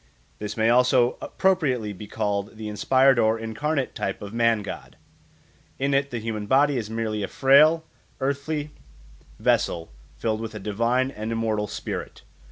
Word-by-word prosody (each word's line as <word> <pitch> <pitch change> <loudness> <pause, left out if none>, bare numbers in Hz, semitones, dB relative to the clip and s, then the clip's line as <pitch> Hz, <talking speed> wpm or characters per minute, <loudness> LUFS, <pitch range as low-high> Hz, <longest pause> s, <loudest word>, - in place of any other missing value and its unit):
This 105 +1 -5
may 110 +1 +3
also 125 0 +3
appropriately 135 - 0
be 105 +2 -9
called 105 0 -2
the 110 -1 -6
inspired 130 +4 +3
or 110 0 +3
incarnate 130 +6 -2
type 95 - -3
of 100 +1 -8
man 115 -2 +2
god. 100 - -8 0.8
In 140 +1 0
it 140 0 +2
the 120 - -4
human 110 -2 -4
body 140 +3 +4
is 110 -4 -3
merely 110 -1 -2
a 100 - -2
frail 155 +4 +5 0.3
earthly 145 +2 -2 0.7
vessel 85 -6 0 0.3
filled 110 -1 -1
with 110 -1 -6
a - - -5
divine 115 +6 0
and 110 -2 -5
immortal 110 -2 -1
spirit. - - -6
115 Hz, 155 wpm, -25 LUFS, 105-135 Hz, 0.8 s, frail